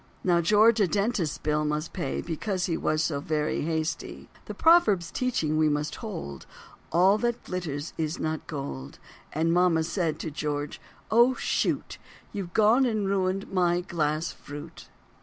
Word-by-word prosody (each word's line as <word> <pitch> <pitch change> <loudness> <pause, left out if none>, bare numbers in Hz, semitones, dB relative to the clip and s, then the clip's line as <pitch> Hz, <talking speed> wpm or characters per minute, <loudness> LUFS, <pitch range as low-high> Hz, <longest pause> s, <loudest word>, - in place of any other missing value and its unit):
Now 175 -2 +3
George 215 +6 +5
a 200 - +4
dentist's 200 -5 0
bill 150 0 0
must 150 +1 -2
pay 180 - -2
Because 180 +3 -2
he 170 - -1
was 155 0 0
so 150 -3 -1
very 150 0 -1
hasty. 160 +1 -3 0.2
The - - -7
proverb's 215 - +4
teachings 160 -12 0
we 155 -1 +4
must 150 0 -2
hold 170 - -7 0.4
"All 190 +5 +4
that 240 0 -1
glitters 160 -5 -4
is 155 0 -1
not 155 0 -3
gold." 70 - -6 0.3
And 165 +2 +1
mama 175 -2 +3
said 165 -1 -1
to 160 - -4
George, 145 0 -3 0.3
"Oh, 240 +3 +5
shoot, - - -1 0.3
You've 185 -4 -5
gone 225 +5 +5
and 215 -4 0
ruined 195 0 -1
my 175 -1 +2
glass 160 -2 -1
fruit." 145 +3 -10
170 Hz, 155 wpm, -27 LUFS, 155-200 Hz, 0.4 s, George